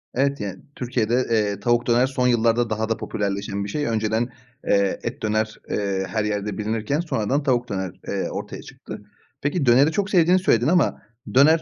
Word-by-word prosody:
Evet, 140 +2 +1
yani, 100 -2 -5 0.2
Türkiye'de, 120 -2 0 0.2
eee, 105 -3 +1
tavuk 120 +2 +1
döner 120 +2 +4
son 130 -1 0
yıllarda 120 -1 +2
daha 110 +1 -1
da 115 - 0
popülerleşen 100 -1 -3
bir 100 - -5
şey. 145 +7 -2
Önceden, 110 +1 0 0.4
eee, 100 -1 +2
et 125 +5 -4
döner, 110 0 -1
eee, 100 -2 -1
her 110 -1 -1
yerde 105 -1 -2
bilinirken 110 +6 -1
sonradan 140 -4 -1
tavuk 125 -3 +1
döner, 95 -2 -3 0.2
eee, - - -2
ortaya - - -6
çıktı. - - -10 0.4
Peki, 145 +1 0
döneri 130 +5 +5
çok 200 +4 -1
sevdiğini 180 -1 +4
söyledin 120 - +2
ama 170 -2 +2 0.3
döner 155 +5 +6
115 Hz, 175 wpm, -23 LUFS, 105-135 Hz, 0.4 s, döner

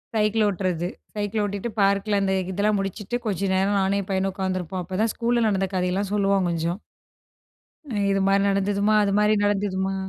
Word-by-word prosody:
Cycle 215 0 +2
ஓட்டுறது. 180 -3 -1 0.3
Cycle 210 +1 -1
ஓட்டிட்டு 205 +2 -3
பார்க்கில 200 +1 +2
அந்த 190 -1 +1 0.2
இதெல்லாம் 205 +2 +1
முடிச்சிட்டு, 195 +3 -4
கொஞ்சம் 195 -2 -1
நேரம் 195 +2 +2
நானும் 195 +1 +1
என் 190 - -10
பையனும் 190 0 0
உட்காந்துருப்போம். 185 -1 -3
அப்பதான் 190 +5 -1
ஸ்கூல்ல 235 0 +1
நடந்த 195 -2 +1
கதையெல்லாம் 185 +2 -1
சொல்லுவான் 195 -2 +2
கொஞ்சம். 170 +2 -2 1.1
ம், 205 - 0
இது 195 0 +1
மாரி 195 0 +3
நடந்ததுமா, 200 +2 +1
அது 200 - 0
மாதிரி 210 +1 +3
நடந்ததுமா. 195 -1 0
195 Hz, 160 wpm, -24 LUFS, 190-205 Hz, 1.1 s, மாரி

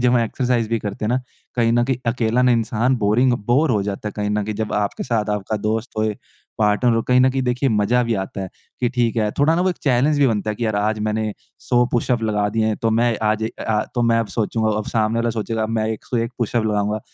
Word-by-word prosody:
जब 125 0 +3
हम 125 - +4
एक्सरसाइज़ 120 0 0
भी 115 - 0
करते 105 0 -5
हैं - - 0
ना, 125 +1 +1 0.4
कहीं 115 -1 +3
न 120 0 +3
कहीं 130 0 0
अकेला 115 0 +1
ना 125 -1 +4
इंसान 115 +2 +1
बोरिंग 120 +4 +2
बोर 140 +5 +3
हो 105 -4 +1
जाता 100 +1 -4
है - - -7
कहीं 105 0 -1
न 105 0 0
कहीं 110 +1 -4
जब 110 +1 -3
आपके 105 -1 -1
साथ 110 -4 -1
आपका 105 +1 -2
दोस्त 110 +3 -2
होए, 110 -1 0 0.4
पार्टनर 110 +3 +3
हो 115 - +1
कहीं 125 +2 +3
न 130 +1 +5
कहीं 135 0 -1
देखिए 125 +2 0
मज़ा 110 +3 +2
भी 115 -1 0
आता 95 - -7
है 95 - -4 0.3
कि 120 - +2
ठीक 120 -2 0
है, 105 -2 +1
थोड़ा 150 +3 +4
ना 170 - +1
वो 185 - +2
एक 180 - -5
चैलेंज 140 +2 +2
भी 140 - +5
बनता 110 -3 0
है 105 - -4
कि 120 - -3
यार 110 -1 0
आज 105 +1 0
मैंने 110 0 -1 0.3
100 120 0 +2
पुश-अप 120 -1 +1
लगा 105 -2 +1
दिए 110 0 +1
हैं 110 -1 0
तो 115 - +2
मैं 115 +1 +2
आज 110 0 +1
ए, 110 - 0
अ - - -4
आ 110 -1 +1
तो 120 - +1
मैं 115 -1 +3
अब 115 - -2
सोचूँगा 110 -1 0
अब 110 - -4
सामने 110 0 +1
वाला 115 0 +1
सोचेगा 110 0 -2
मैं 110 -1 -1
101 115 +2 -3
पुश-अप 120 -1 0
लगाऊँगा। 105 0 0
115 Hz, 265 wpm, -21 LUFS, 105-120 Hz, 0.4 s, न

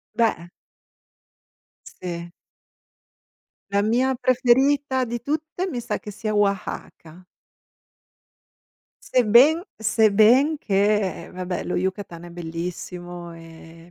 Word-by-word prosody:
Beh. 220 -7 0 1.5
Sì. 170 -1 -5 1.4
La 200 - +2
mia 250 +5 +1
preferita 260 +2 +2
di 240 -1 -4
tutte, 310 +6 -3
mi 245 -8 -4
sa - - -3
che 215 - -9
sia 215 +1 -4
Oaxaca. 190 -4 -3 1.9
Sebben 255 +8 +5 0.2
sebben 220 +7 +4
che 205 -4 0
vabbè, 180 0 -4
lo - - -2
Yucatan 185 -2 -4
è - - -10
bellissimo 175 +1 -7
e 165 0 -14
210 Hz, 90 wpm, -23 LUFS, 175-250 Hz, 1.9 s, Sebben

